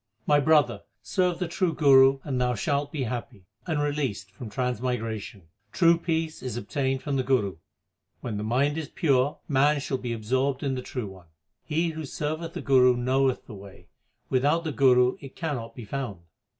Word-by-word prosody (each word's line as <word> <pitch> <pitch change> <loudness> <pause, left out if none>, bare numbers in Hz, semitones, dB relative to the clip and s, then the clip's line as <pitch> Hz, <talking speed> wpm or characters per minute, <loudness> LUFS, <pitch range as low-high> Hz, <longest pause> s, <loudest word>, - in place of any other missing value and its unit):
My 145 -1 +4
brother, 145 -4 +3 0.2
serve 180 - 0
the 180 0 -2
true 170 -1 -1
Guru 135 -2 +6
and 130 -4 -2
thou 125 0 +1
shalt 145 +5 -1
be 145 -4 -2
happy, 120 -4 -5 0.2
and 160 -3 0
released 140 -10 -2
from 110 +3 -9
transmigration. 115 -3 -3 0.3
True 170 -1 +5
peace 165 -1 -2
is 125 -3 -4
obtained 130 +3 -2
from 140 -1 -1
the 130 - +1
Guru. 120 -9 +1 0.6
When 110 -4 -4
the 105 - -3
mind 140 +7 +1
is 155 - -6
pure, 140 -3 +1
man 145 +1 +3
shall 135 -1 -3
be 125 -2 -4
absorbed 130 +5 -1
in 135 -2 0
the 130 - -3
True 125 -2 -5
One. 95 -3 -13 0.4
He 165 +3 0
who 160 -1 -5
serveth 155 +4 -4
the - - -5
Guru 125 -2 +5
knoweth 130 +1 +1
the 115 - -10
way; 95 -2 -13 0.4
without 145 +6 +2
the 160 - -2
Guru 125 -2 +4
it 135 -1 -11
cannot 140 -9 -4
be 120 - -8
found. 115 -6 -5
135 Hz, 180 wpm, -26 LUFS, 120-150 Hz, 0.6 s, Guru